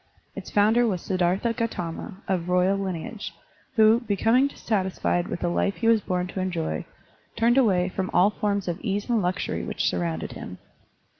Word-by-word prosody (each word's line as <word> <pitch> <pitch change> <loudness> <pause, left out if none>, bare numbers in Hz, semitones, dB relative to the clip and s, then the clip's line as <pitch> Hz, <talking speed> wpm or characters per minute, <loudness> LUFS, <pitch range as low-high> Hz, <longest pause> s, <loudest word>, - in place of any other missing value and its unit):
Its - - -7
founder 220 +4 +4
was 190 -5 0
Siddhartha 185 +6 0
Gautama, 200 -3 -4
of 180 -2 -1
royal 180 +2 +3
lineage, 195 +2 -5 0.4
who, 220 0 +6
becoming 230 +4 +2
dis - - -12
satisfied 190 -4 0
with - - -5
the - - 0
life 195 +3 0
he 230 - -1
was 225 -2 +5
bom 180 -1 -1
to 180 +1 -6
enjoy, 170 - -2 0.5
turned 235 +1 +3
away 195 -9 +3
from 185 0 -3
all 185 +4 +4
forms 200 -2 -1
of 175 +1 -3
ease 205 -3 -2
and 235 -3 +2
luxury 180 0 -2
which - - -1
surrounded 85 -2 -2
him. - - -8
195 Hz, 170 wpm, -25 LUFS, 180-220 Hz, 0.5 s, who